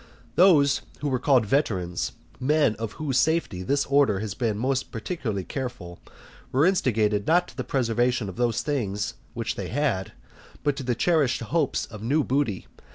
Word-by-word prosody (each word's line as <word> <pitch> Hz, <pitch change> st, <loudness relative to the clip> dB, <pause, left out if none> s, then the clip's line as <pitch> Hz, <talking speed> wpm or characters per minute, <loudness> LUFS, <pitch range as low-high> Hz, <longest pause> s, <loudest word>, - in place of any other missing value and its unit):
Those 145 Hz, -5 st, +5 dB, 0.2 s
who 145 Hz, -, -1 dB
were 130 Hz, -2 st, 0 dB
called 130 Hz, -3 st, +3 dB
Veterans, 95 Hz, -, 0 dB, 0.3 s
men 145 Hz, -2 st, +3 dB
of 115 Hz, -1 st, -4 dB
whose 140 Hz, -5 st, 0 dB
safety 160 Hz, -, +1 dB
this 140 Hz, +9 st, +1 dB
order 140 Hz, -7 st, +3 dB
had 105 Hz, -2 st, -4 dB
been 110 Hz, -4 st, 0 dB
most 130 Hz, +3 st, -1 dB
particularly 115 Hz, -, -3 dB
careful, 90 Hz, -9 st, -6 dB, 0.5 s
were 135 Hz, +4 st, +3 dB
instigated 110 Hz, -, +2 dB
not 175 Hz, +2 st, +3 dB
to -, -, -15 dB
the -, -, -3 dB
preservation 120 Hz, -2 st, 0 dB
of 95 Hz, -, -7 dB
those 120 Hz, -1 st, 0 dB
things 105 Hz, -8 st, -2 dB, 0.2 s
which -, -, -2 dB
they -, -, -5 dB
had, 125 Hz, -8 st, -1 dB, 0.5 s
but 145 Hz, -2 st, +1 dB
to 125 Hz, -3 st, -1 dB
cherish 150 Hz, -2 st, +2 dB
hopes 150 Hz, +5 st, 0 dB
of 105 Hz, -, -10 dB
new 140 Hz, +7 st, +1 dB
booty. 130 Hz, -9 st, -1 dB
125 Hz, 160 wpm, -25 LUFS, 105-145 Hz, 0.5 s, Those